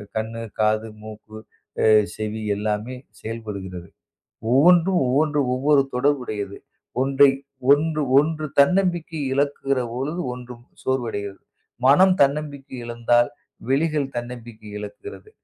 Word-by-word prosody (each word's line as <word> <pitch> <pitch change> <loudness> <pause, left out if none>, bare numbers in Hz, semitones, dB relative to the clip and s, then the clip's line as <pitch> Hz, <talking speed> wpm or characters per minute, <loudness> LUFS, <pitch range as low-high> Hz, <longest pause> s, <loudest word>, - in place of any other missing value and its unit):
கண்ணு, 110 +1 -3 0.2
காது, 110 +1 +2
மூக்கு, 110 0 -11 0.5
அ - - +4 0.3
செவி 110 0 -4
எல்லாமே 105 +4 -2 0.3
செயல்படுகிறது. 100 -6 -7 0.6
ஒவ்வொன்றும் 175 +6 +5
ஒவ்வொன்று 145 +4 +1
ஒவ்வொரு 140 +2 +3
தொடர்பு 140 +2 +1
உடையது. 100 -3 -5 0.4
ஒன்றை 135 +1 +5 0.4
ஒன்று 155 +1 +3 0.2
ஒன்று. 155 +1 -1
தன்னம்பிக்கை 175 0 +2
இழக்கிற 140 -1 0
பொழுது 150 +8 -3
ஒன்றும் 125 -1 -10 0.2
சோர்வடைகிறது. 115 -6 -3 0.5
மனம் 185 +7 +6
தன்னம்பிக்கை 140 -1 0
இழந்தால் 120 +1 +2 0.4
விழிகள் 150 0 +1
தன்னம்பிக்கை 120 -3 -8
இழக்கிறது. 405 - -9
130 Hz, 100 wpm, -23 LUFS, 110-150 Hz, 0.6 s, மனம்